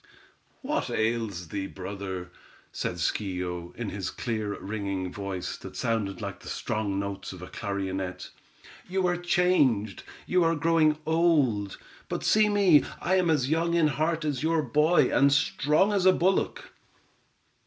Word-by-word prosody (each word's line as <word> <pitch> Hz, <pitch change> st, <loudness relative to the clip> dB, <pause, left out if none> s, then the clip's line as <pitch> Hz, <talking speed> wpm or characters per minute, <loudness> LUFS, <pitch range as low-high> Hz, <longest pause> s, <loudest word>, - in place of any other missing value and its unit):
"What -, -, -1 dB
ails 110 Hz, -6 st, -1 dB
thee, 100 Hz, 0 st, -3 dB
brother," 95 Hz, -2 st, -6 dB, 0.4 s
said -, -, -3 dB
Schio, 90 Hz, -3 st, -3 dB
in 115 Hz, -3 st, -4 dB
his 95 Hz, -1 st, -4 dB
clear, 110 Hz, -4 st, -3 dB
ringing 100 Hz, -3 st, -4 dB
voice, 100 Hz, -3 st, -4 dB
that -, -, -10 dB
sounded 110 Hz, -4 st, -1 dB
like 100 Hz, -1 st, -5 dB
the -, -, -13 dB
strong 105 Hz, -2 st, -2 dB
notes 100 Hz, -1 st, -5 dB
of 90 Hz, -1 st, -10 dB
a -, -, -7 dB
clarionet. 95 Hz, -2 st, -4 dB, 0.6 s
"You 190 Hz, 0 st, 0 dB
are 175 Hz, 0 st, +2 dB
changed; 175 Hz, -, +2 dB, 0.2 s
you 180 Hz, -1 st, +2 dB
are 165 Hz, 0 st, +2 dB
growing 160 Hz, -1 st, +3 dB
old, 150 Hz, -, +2 dB, 0.3 s
but -, -, -3 dB
see 215 Hz, 0 st, +4 dB
me, 195 Hz, -7 st, +5 dB, 0.2 s
I 185 Hz, +2 st, +1 dB
am 180 Hz, -2 st, +2 dB
as 145 Hz, -3 st, +1 dB
young 170 Hz, +1 st, +1 dB
in 160 Hz, -3 st, +4 dB
heart 155 Hz, +2 st, -1 dB
as 145 Hz, -4 st, -1 dB
your 160 Hz, 0 st, +1 dB
boy, 150 Hz, +6 st, +3 dB
and 140 Hz, +1 st, +5 dB
strong 150 Hz, +6 st, +2 dB
as 190 Hz, -2 st, +3 dB
a 185 Hz, -, +7 dB
bullock." 185 Hz, +2 st, 0 dB
120 Hz, 150 wpm, -27 LUFS, 100-165 Hz, 0.6 s, a